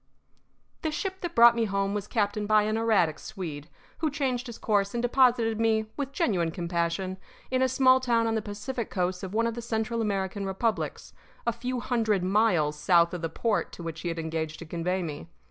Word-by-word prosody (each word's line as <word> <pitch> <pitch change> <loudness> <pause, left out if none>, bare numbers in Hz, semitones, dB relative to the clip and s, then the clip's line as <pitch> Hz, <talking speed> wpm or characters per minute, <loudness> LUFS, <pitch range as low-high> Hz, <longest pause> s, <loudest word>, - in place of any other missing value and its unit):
The 315 - -1
ship 380 +5 -4
that 345 -1 -4
brought 235 0 +8
me 230 -1 +1
home 195 -1 -1
was 205 0 -3
captained 210 -1 0
by 215 0 +5
an 215 +1 0
erratic 210 -9 +2
Swede, 160 -6 -7 0.3
who 315 - +1
changed 265 -3 -2
his 235 - -8
course 200 -1 0
and 235 - 0
deposited 240 -3 +3
me, 220 -1 +2
with 280 -2 -3
genuine 200 - +1
compassion, 170 +2 -2 0.3
in 255 0 +2
a 260 - +3
small 260 0 +5
town 235 -3 +2
on 225 - 0
the 220 - 0
Pacific 215 +3 -5
coast 180 -1 -1
of 190 +1 -6
one 230 +1 +2
of 230 - 0
the 235 - -5
Central 230 0 -2
American 200 -2 -1
republics, 195 +4 -2 0.3
a 235 - +1
few 250 +2 -3
hundred 220 -7 +1
miles 185 -7 +2
south 170 +2 +4
of 180 - -4
the 165 - -2
port 215 +6 -1
to 170 - -8
which 165 -1 -5
he - - -4
had 165 -1 -2
engaged 160 -1 -3
to 165 - -9
convey 175 +3 -2
me. 150 -1 -6
210 Hz, 205 wpm, -27 LUFS, 180-235 Hz, 0.3 s, brought